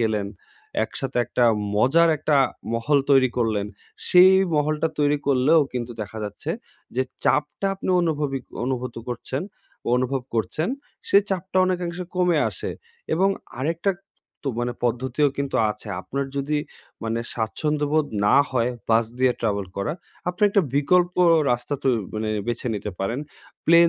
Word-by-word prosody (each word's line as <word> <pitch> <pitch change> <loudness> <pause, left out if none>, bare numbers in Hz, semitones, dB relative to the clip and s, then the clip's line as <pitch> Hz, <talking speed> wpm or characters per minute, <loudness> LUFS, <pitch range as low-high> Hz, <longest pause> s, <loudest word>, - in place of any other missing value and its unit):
গেলেন, 105 -3 0 0.6
একসাথে 135 -2 -4
একটা 120 +1 +1 0.3
মজার 155 +10 +5
একটা 150 0 +2 0.4
মহল 140 +5 +2
তৈরি 130 -2 +5
করলেন। 110 -4 +1 0.4
সেই 185 +1 +8 0.2
মহলটা 150 +2 +1
তৈরি 145 0 +3
করলেও 140 +4 +5
কিন্তু 120 -1 -3
দেখা 105 +2 -8
যাচ্ছে 105 - -5 0.5
যে, 130 - +3 0.2
চাপটা 150 +6 +1
আপনি 190 - -3
অনুভবি 150 -5 0 0.3
অনুভুত 125 -1 -2
করছেন, 125 +3 -3 0.5
অনুভব 130 +1 0
করছেন, 115 - -1 0.4
সেই 200 +1 +6
চাপটা 190 0 -3
অনেকাংশে 180 -1 -2
কমে 180 -3 +3
আসে। - - -5 0.4
এবং 190 +4 +3 0.3
আরেকটা, 165 +7 0 0.5
তো 140 - -2
মানে 120 0 -1
পদ্ধতিও 130 +5 +1
কিন্তু 140 -2 -1
আছে। 105 +1 -8
আপনার 140 +8 -3
যদি 145 +2 0 0.5
মানে 115 +1 -1
স্বাচ্ছন্দ্যবোধ 150 +6 0 0.2
না 120 - +5
হয় 125 -1 +1 0.2
বাস 115 +1 +4
দিয়ে 130 -1 +4
ট্রাভেল 100 -3 0
করা, 100 +9 -1 0.4
আপনি 180 +3 -4
একটা 200 -1 +3
বিকল্প 175 +5 +3 0.4
রাস্তা 120 +4 -2
তো - - +2 0.3
মানে 110 0 -2 0.2
বেছে 120 +1 -2
নিতে 100 - -4
পারেন। 115 +8 -2 0.5
প্লেন 170 +1 +7
140 Hz, 140 wpm, -24 LUFS, 120-160 Hz, 0.6 s, সেই